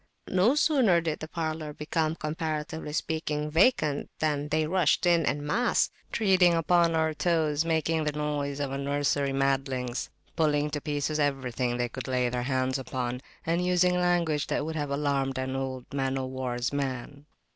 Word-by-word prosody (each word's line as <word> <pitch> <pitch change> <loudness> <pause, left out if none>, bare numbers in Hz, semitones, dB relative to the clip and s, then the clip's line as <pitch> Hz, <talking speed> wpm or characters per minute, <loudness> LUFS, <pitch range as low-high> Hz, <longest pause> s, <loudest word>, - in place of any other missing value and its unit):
No 195 +9 +4
sooner 265 - +4
did 160 -2 -2
the 155 - -6
parlour 155 -2 -3
become, 155 +1 -1
comparatively 155 0 -4
speaking, 150 -1 -2
vacant 160 - +2
than 150 -1 -1
they 155 0 +1
rushed 170 0 +2
in 170 -2 +3
en 145 +1 -1
masse, 235 +12 +2 0.2
treading 185 -5 +4
upon 170 0 +3
our 160 -1 +1
toes, 155 -1 +1
making 160 -1 +1
the 150 - +1
noise 145 -1 -2
of 140 -2 -2
a 135 - -3
nursery 140 0 0
of 135 - -2
madlings, 135 -2 -1 0.3
pulling 150 -2 +1
to 150 - -3
pieces 150 +1 -1
everything 130 -4 0
they 120 0 0
could 125 +1 -7
lay 125 -1 +1
their 125 0 -2
hands 130 0 0
upon, 125 -1 -3 0.2
and 170 +2 +1
using 180 0 +3
language 175 -4 +1
that - - -1
would 160 0 -4
have 145 -2 -2
alarmed 140 -2 0
an 130 0 -2
old 130 -2 -4
man 135 -1 0
o'war's 130 -1 -3
man. 140 +1 -4
150 Hz, 165 wpm, -28 LUFS, 135-160 Hz, 0.3 s, No